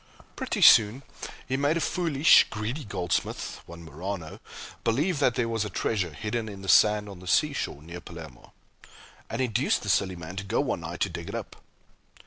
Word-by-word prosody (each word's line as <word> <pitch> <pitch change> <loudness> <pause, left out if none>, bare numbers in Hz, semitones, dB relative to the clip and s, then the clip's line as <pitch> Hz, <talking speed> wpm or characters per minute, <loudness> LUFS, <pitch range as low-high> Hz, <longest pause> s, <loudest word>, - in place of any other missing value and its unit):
Pretty - - -2
soon 110 +5 +7 0.4
he 130 - -1
made 145 +4 +1
a - - 0
foolish, 160 -3 +4
greedy 115 +8 -4
goldsmith, 90 -4 -3
one 85 0 -11
Marano, 80 +1 -6 0.4
believe 145 +8 +1
that 130 -4 +2
there 120 - 0
was 115 -2 -1
a 105 - -4
treasure 95 -3 -1
hidden 110 +8 -4
in 100 -1 -9
the - - -8
sand 105 +4 +5
on 100 -3 -10
the 90 - -12
sea 150 +10 +3
shore 75 - -4
near 85 +2 -9
Palermo, 80 -7 -11 0.8
and 115 - -3
induced 125 +2 0
the 100 - -4
silly 95 -2 +1
man 85 +2 -9
to 100 - -3
go 100 - -1
one - - -1
night - - -7
to - - +2
dig - - -7
it - - -5
up. - - -6
105 Hz, 190 wpm, -27 LUFS, 90-125 Hz, 0.8 s, soon